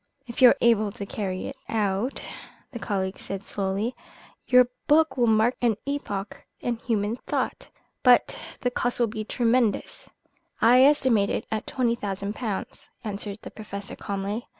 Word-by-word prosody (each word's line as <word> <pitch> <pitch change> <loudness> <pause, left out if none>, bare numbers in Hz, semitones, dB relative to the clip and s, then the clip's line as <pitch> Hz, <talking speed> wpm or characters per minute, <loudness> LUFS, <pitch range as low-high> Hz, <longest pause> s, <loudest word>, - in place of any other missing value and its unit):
"If 235 +2 -7
you 250 - +10
are - - +3
able 215 -3 +3
to 205 -4 -6
carry 190 -2 -4
it 275 - -7
out," 210 +3 0 0.5
the 240 - -6
colleague 190 -3 -2
said 195 0 -6
slowly, 200 +5 -2 0.5
"your 250 -1 +6 0.2
book 315 +1 +4
will 245 -2 +2
mark 220 +3 +3
an 230 -4 +2
epoch 210 -8 -4 0.2
in 240 -1 -2
human 225 -1 -1
thought. - - -3 0.3
But 250 -1 +5 0.3
the 245 - 0
cost 245 0 -1
will 240 - +4
be 215 -1 -4
tremendous." 235 0 0 0.5
"I 245 +3 +6
estimate 255 -8 +3
it - - -2
at 220 -1 -3
twenty 245 -3 +1
thousand 200 -2 -4
pounds," 215 -4 -5
answered 205 -1 -3
the - - -8
Professor 200 -2 -7
calmly. 200 +4 -4
220 Hz, 155 wpm, -26 LUFS, 200-245 Hz, 0.5 s, you